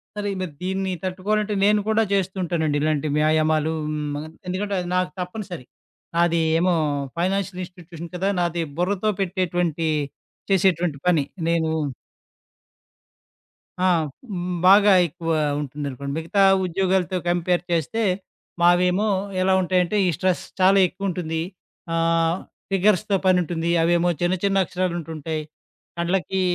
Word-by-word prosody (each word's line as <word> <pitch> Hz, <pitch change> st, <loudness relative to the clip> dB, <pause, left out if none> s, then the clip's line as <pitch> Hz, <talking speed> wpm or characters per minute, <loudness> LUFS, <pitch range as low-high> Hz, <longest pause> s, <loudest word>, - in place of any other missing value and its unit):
సరే 205 Hz, -1 st, -2 dB
మరి 170 Hz, -5 st, -4 dB
దీన్ని 190 Hz, 0 st, -1 dB
తట్టుకోవాలంటే 205 Hz, +3 st, -1 dB
నేను 210 Hz, +1 st, +4 dB
కూడా 220 Hz, +1 st, +3 dB
చేస్తూ 190 Hz, -1 st, 0 dB
ఉంటానండి. 160 Hz, -4 st, 0 dB
ఇలాంటి 155 Hz, -1 st, 0 dB
వ్యాయామాలు 155 Hz, 0 st, +2 dB, 0.2 s
హ్మ్, 150 Hz, -1 st, -3 dB, 0.3 s
ఎందుకంటే 200 Hz, +3 st, -2 dB
అది 180 Hz, 0 st, -4 dB
నాకు 185 Hz, 0 st, 0 dB
తప్పనిసరి. 180 Hz, -, -6 dB, 0.5 s
నాది 170 Hz, -1 st, +3 dB, 0.2 s
ఏమో 180 Hz, +1 st, +2 dB, 0.5 s
ఫైనాన్షియల్ 185 Hz, +1 st, -1 dB
ఇన్‌స్టిట్యూషన్ 170 Hz, -2 st, -11 dB
కదా! 190 Hz, +2 st, 0 dB
నాది 170 Hz, -1 st, 0 dB, 0.2 s
బుర్రతో 200 Hz, +3 st, +1 dB
పెట్టేటువంటి 175 Hz, -3 st, -1 dB, 0.6 s
చేసేటువంటి 180 Hz, -5 st, +2 dB
పని. 165 Hz, -5 st, +4 dB, 0.3 s
నేను 165 Hz, -1 st, +1 dB, 2.1 s
ఆ! -, -, +3 dB, 0.8 s
బాగా 200 Hz, +2 st, +7 dB, 0.2 s
ఎక్కువ 165 Hz, +1 st, -6 dB, 0.3 s
ఉంటుందనుకోండి. 140 Hz, -1 st, -5 dB
మిగతా 165 Hz, +5 st, 0 dB, 0.2 s
ఉద్యోగాలతో 185 Hz, +1 st, 0 dB
కంపేర్ 175 Hz, 0 st, +1 dB
చేస్తే 170 Hz, +7 st, 0 dB, 0.6 s
మావేమో 180 Hz, +4 st, +4 dB, 0.3 s
ఎలా 190 Hz, 0 st, +3 dB
ఉంటాయంటే 180 Hz, +2 st, +1 dB
ఈ -, -, +3 dB
స్ట్రెస్ 185 Hz, +2 st, 0 dB, 0.2 s
చాలా 195 Hz, +1 st, +5 dB
ఎక్కువుంటుంది. 175 Hz, -4 st, -3 dB, 0.5 s
ఆహ్, 165 Hz, 0 st, +2 dB, 0.3 s
ఫిగర్స్‌తో 200 Hz, +1 st, +2 dB
పనుంటుంది. 175 Hz, -2 st, +1 dB
అవేమో 175 Hz, +1 st, +3 dB
చిన్న 175 Hz, +1 st, +2 dB
చిన్న 195 Hz, -1 st, +3 dB
అక్షరాలుంటుంటాయి. 165 Hz, -3 st, -3 dB, 0.6 s
కండ్లకి 185 Hz, +2 st, 0 dB
180 Hz, 110 wpm, -23 LUFS, 165-190 Hz, 2.1 s, బాగా